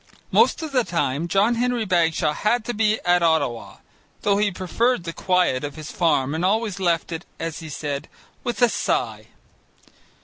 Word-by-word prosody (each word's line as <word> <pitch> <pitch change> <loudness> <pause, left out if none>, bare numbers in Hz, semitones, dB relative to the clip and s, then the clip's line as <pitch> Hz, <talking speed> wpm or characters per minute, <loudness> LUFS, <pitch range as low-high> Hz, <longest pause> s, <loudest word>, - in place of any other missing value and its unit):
Most 460 -7 +3
of 315 - -5
the 255 -3 +2
time, 165 -4 -1
John 200 +6 +3
Henry 240 -1 0
Bagshaw 165 -4 +2
had 225 +5 0
to 240 - -2
be 215 0 +1
at 175 0 +3
Ottawa 150 -8 0 0.5
(though 200 -1 +3
he 205 0 +2
preferred 200 +4 0
the 165 0 -5
quiet 180 -9 +1
of 145 -1 -5
his 155 -1 -8
farm 145 -5 +1
and 160 +2 -2
always 205 0 0
left 175 -2 0
it, 165 +1 -4 0.2
as 165 -1 -4
he 160 - -8
said, 145 -1 -4 0.3
with 240 -2 -1
a 240 - +6
sigh). - - -1
180 Hz, 175 wpm, -23 LUFS, 160-220 Hz, 0.5 s, a